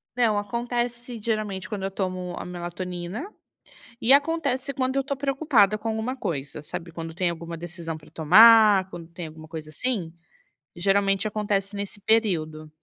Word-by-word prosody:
Não, 230 -4 +3
acontece 240 +2 -3
geralmente 215 -3 -2
quando 210 -3 -5
eu 195 - -2
tomo 185 -2 -3
a - - -5
melatonina, 180 - -5 0.7
e 235 - +3
acontece 280 -2 +2
quando 260 -1 -1
eu 275 - +3
estou 280 +1 -3
preocupada 275 -7 +2
com 215 +2 -6
alguma 225 +3 -2
coisa. 150 - -4
Sabe, 175 +2 -7
quando 165 0 -6
tem 180 +1 0
alguma 170 0 -6
decisão 170 -1 -6
para 155 -1 -14
tomar, 205 +3 +7
quando 170 -3 -9
tem 170 0 -7
alguma 155 0 -12
coisa 155 -1 -8
assim? 185 - -2 0.6
Geralmente 195 +2 +2
acontece 205 -1 -1
nesse 200 0 -6
período. 165 -8 +1
195 Hz, 155 wpm, -25 LUFS, 175-235 Hz, 0.7 s, tomar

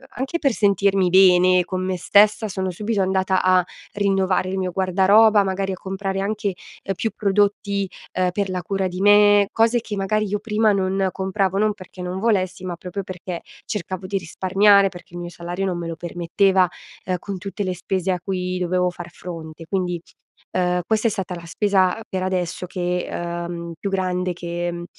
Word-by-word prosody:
anche 270 +7 -2
per 275 -5 +2
sentirmi 195 -3 +2
bene 185 -1 +6
con 185 0 -3
me 185 0 -1
stessa, 210 +4 +4
sono 190 -2 -3
subito 210 +2 -1
andata 190 0 +1
a 185 -1 +4 0.3
rinnovare 195 -2 +1
il 190 - -2
mio 185 -1 -1
guardaroba; 200 +3 +4
magari 195 0 -2
a - - -3
comprare 195 +1 -4
anche, 205 -1 -1 0.3
uhm, 195 - -2
più 220 +2 -2
prodotti, 200 -1 +1 0.3
uhm, 185 -1 +2
per 200 +1 -2
la 180 -1 -2
cura 195 +1 -1
di 180 +1 -5
me, 205 0 +6
cose 230 +1 +2
che 210 -2 -5
magari 215 +2 0
io 205 +1 -1
prima 215 0 +2
non 190 -1 +1
compravo, 190 0 -1
non 215 0 +2
perché 185 -2 -12
non 180 +1 -4
volessi, 190 -4 0
ma 175 - -3
proprio 180 +3 -6
perché 180 -1 -6 0.2
cercavo 185 -3 -4
di 195 0 -1
risparmiare, 195 +3 +4
perché 175 -1 -14
il - - -5
mio 175 0 -5
salario 175 +3 -4
non 180 -2 -1
me 170 -1 -4
lo 165 - -4
permetteva, 180 +2 +1 0.4
uhm, 185 0 0
con 195 +1 -5
tutte 200 +2 -5
le 185 -1 -2
spese 185 +1 -1
a 180 - -1
cui 185 -1 -2
dovevo 180 0 +1
far 175 -1 -9
fronte. 165 -2 -9
Quindi, 180 -3 -1 0.5
uhm, 180 -1 +1
questa 220 +1 +2
è - - +1
stata 190 -3 -4
la 170 -1 -9
spesa 190 +2 +1
per 185 -1 -3
adesso 180 -1 -2
che 180 0 -2
uhm, 170 0 -4
più 200 - -3
grande 180 -1 -1
che 175 0 -4
uhm, 175 0 -6
190 Hz, 185 wpm, -22 LUFS, 180-200 Hz, 0.5 s, bene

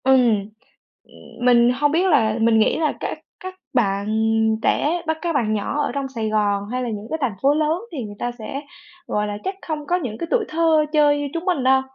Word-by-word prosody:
Ừm, 240 -6 +3 0.5
ừm, 245 - -10
mình 240 -1 +5
hông 290 +3 +1
biết 340 +4 +2
là 225 -10 +3
mình 225 0 +4
nghĩ 215 - +3
là 310 -2 +1
các - - -4 0.2
các 370 0 -7 0.2
bạn 200 -5 +1 0.5
trẻ 335 +8 +1
bắt 320 0 0
các 340 0 -1
bạn 220 -5 +1
nhỏ 215 +8 -1
ở - - -1
trong 275 -1 -2
Sài 225 -5 -3
Gòn 205 -2 +1
hay 255 0 -2
là 245 - -2
những 210 -1 -5
cái 320 - -2
thành 245 -7 -1
phố 275 +2 +4
lớn, 310 +3 0
thì 280 -7 -4
người 205 -1 -8
ta 240 - -2
sẽ, 270 +6 -5 0.5
gọi 210 0 -1
là, 205 0 -4
chắc 380 +1 -3
không 305 -2 -3
có 350 - +2
những 250 -12 -3
cái 335 - -4
tuổi 460 -4 +2
thơ 320 -1 +3
chơi 295 -1 +4
như 290 - -2
chúng 335 +1 -4
mình 355 -8 0
đâu. 265 +1 +4
265 Hz, 230 wpm, -21 LUFS, 220-315 Hz, 0.5 s, mình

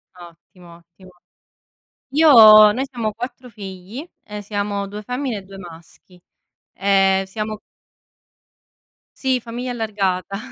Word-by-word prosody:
Ottimo, 175 0 -16
ottimo. 175 +2 -20 1.0
Io 220 -8 +8
noi 260 +5 -2
siamo 230 -4 -4
4 245 +2 -8
figli, 205 - -9 0.2
ehm, 210 0 -8
siamo 205 -1 -3
2 205 +2 -8
femmine 250 0 -4
e - - -7
2 195 +1 -13
maschi. 175 0 -15 0.5
Ehm, 195 0 +2
siamo 215 +2 -6 1.6
Sì, 260 -2 0
famiglia 240 +2 -6
allargata. 195 -5 -3
205 Hz, 110 wpm, -20 LUFS, 190-235 Hz, 1.6 s, Io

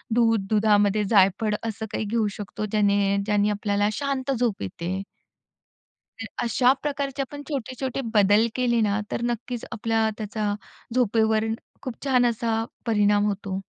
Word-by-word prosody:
दूध, 225 -4 +3
दुधामध्ये 210 -1 +3
जायफळ 200 +1 +3
असं 220 -1 -4
काही 220 - -2
घेऊ 220 +1 +1
शकतो, 210 +1 -4
ज्याने 200 -1 +2
ज्याने 210 0 +2
आपल्याला 205 0 0
शांत 275 +1 -2
झोप 235 -5 0
येते. 170 - -4 1.2
तर 225 - -4 0.2
अशा 245 +2 +4
प्रकारचे 280 -1 -2
आपण 285 +2 -7
छोटे-छोटे 265 -2 -3
बदल 205 +2 +5
केले 240 -2 +2
ना, 210 -1 +1
तर - - -2
नक्कीच 240 0 -4
आपल्याला 225 0 +1
त्याचा 210 -1 -2 0.4
झोपेवर 220 -2 +2 0.4
खूप 255 -3 -7
छान 255 -3 +3
असा 225 -1 0 0.2
परिणाम 205 -2 +3
होतो. 195 -2 -3
220 Hz, 135 wpm, -25 LUFS, 205-240 Hz, 1.2 s, बदल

